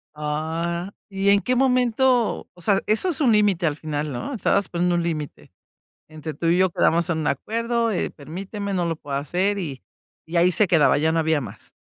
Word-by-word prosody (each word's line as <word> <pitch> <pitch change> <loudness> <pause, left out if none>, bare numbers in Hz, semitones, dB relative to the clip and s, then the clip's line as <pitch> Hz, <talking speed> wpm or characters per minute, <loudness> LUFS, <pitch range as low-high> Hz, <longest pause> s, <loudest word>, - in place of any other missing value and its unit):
Ah, 165 +4 -3 0.2
¿y 195 0 0
en 200 0 +5
qué 250 +3 0
momento?, 250 -1 +2
o 175 - -18
sea, 195 +2 +2
¿eso 225 +13 +2
es 315 -2 -1
un 250 -5 +4
límite 205 -5 +3
al 145 - -1
final, 150 -1 -3
no? 130 - -5
Estabas 200 -3 +1
poniendo 175 0 0
un 170 - 0
límite: 155 -4 -5 0.6
"Entre 155 -1 -7
tú 165 - -4
y 170 +2 +3
yo, 185 -1 +3
¿quedamos 170 +1 +2
en 160 - 0
un 155 - -2
acuerdo?, 230 - -1
eh, 180 - -1
permíteme, 195 +7 -6
no 175 -2 0
lo 165 -2 -2
puedo 140 -3 -5
hacer", 185 +8 0
y 145 -8 -5 0.5
y 175 - -3
ahí 175 +2 +5
se 205 +4 +3
quedaba, 160 -5 +4
ya 160 +2 +1
no 165 - +2
había 160 -2 +1
más. 125 - -10
175 Hz, 205 wpm, -23 LUFS, 155-205 Hz, 0.6 s, en